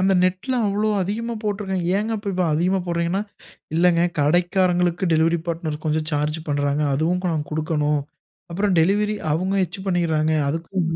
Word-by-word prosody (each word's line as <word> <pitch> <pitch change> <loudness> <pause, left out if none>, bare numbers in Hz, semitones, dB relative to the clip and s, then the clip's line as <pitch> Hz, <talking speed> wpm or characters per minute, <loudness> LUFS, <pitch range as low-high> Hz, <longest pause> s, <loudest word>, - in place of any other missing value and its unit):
அந்த 190 +1 +3
நெட்ல 185 +8 0
அவ்வளோ 205 +2 0
அதிகமா 230 +5 -3
போட்டிருக்கா. 205 -2 -2 0.2
ஏன்ங்க 215 +2 -1
இப்போ 205 -1 -6
இப்ப 185 0 0
அதிகமா 180 +5 +1
போடுகிறீங்கன்னா, 170 +3 0 0.5
இல்லங்க 170 0 +4 0.2
கடைக்காரங்களுக்கு 175 +2 +2
டெலிவரி 165 +2 +3
பார்ட்னர் 160 -2 -3
கொஞ்சம் 155 0 0
சார்ஜ் 150 +2 0
பண்றாங்க. 145 +1 0
அதுவும் 170 +6 0
நாங்க 150 -2 -3
குடுக்கணும். 150 -1 0 0.5
அப்புறம் 195 0 +1
டெலிவரி 205 +5 +2 0.2
அவுங்க 185 +5 0
எட்ச்சு 180 +2 -9
பண்ணிக்கிறாங்க 160 -4 +1 0.2
அதுக்கு, 165 +5 -2
175 Hz, 140 wpm, -22 LUFS, 155-190 Hz, 0.5 s, இல்லங்க